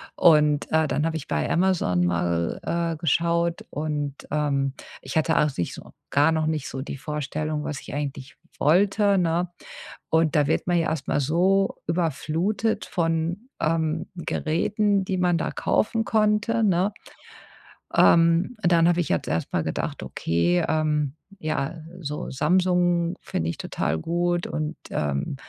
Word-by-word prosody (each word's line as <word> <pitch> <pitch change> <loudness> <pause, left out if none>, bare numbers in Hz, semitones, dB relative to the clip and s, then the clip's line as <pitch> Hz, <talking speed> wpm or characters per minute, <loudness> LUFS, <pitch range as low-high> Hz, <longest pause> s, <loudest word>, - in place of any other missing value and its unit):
Und, 150 -3 +4
äh, 160 0 +3
dann 150 +1 0
habe 165 0 -1
ich 155 - -8
bei 75 -1 -1
Amazon 170 - +2
mal, 85 -1 0
äh, 170 -1 -1
geschaut 170 +2 0
und, 150 -2 -3 0.2
ähm, 140 -3 0 0.3
ich - - -7
hatte 160 +1 +2
auch 150 -2 +2
nicht 85 - -2
so - - -11 0.2
gar 145 +3 +4
noch 160 -1 0
nicht 155 -3 -2
so 130 - -5
die 140 - -6
Vorstellung, 150 +1 -3
was 150 -3 -4
ich - - -9
eigentlich 140 -2 -5 0.2
wollte, 200 +5 +3
ne? 175 0 +1 0.6
Und 160 -1 +2
da 145 -2 +3
wird - - 0
man 175 -1 +2
ja 165 - +1
erstmal 155 -2 -1
so 185 +7 +2
überflutet 170 +6 -1
von, 170 +6 -1
ähm, 160 0 0
Geräten, 200 +5 0
die 190 0 -1
man 180 -1 +2
da - - -2
kaufen 225 +1 0
konnte, 215 +1 +2
ne? 190 0 +2 1.0
Ähm, 170 +6 +4
dann 170 -3 +4
habe 175 0 +3
ich 175 - -1
jetzt 85 - 0
erstmal 80 +3 -1
gedacht: - - -3
„Okay, 85 +2 0
ähm. 150 -3 0 0.2
Ja, 155 -2 -2 0.2
so 150 -3 -5
Samsung 175 +3 +2
finde 80 0 -2
ich - - -9
total 75 +3 -2
gut.” 175 - 0
Und, 155 +1 -3
ähm 70 - -2
160 Hz, 150 wpm, -25 LUFS, 145-175 Hz, 1.0 s, Und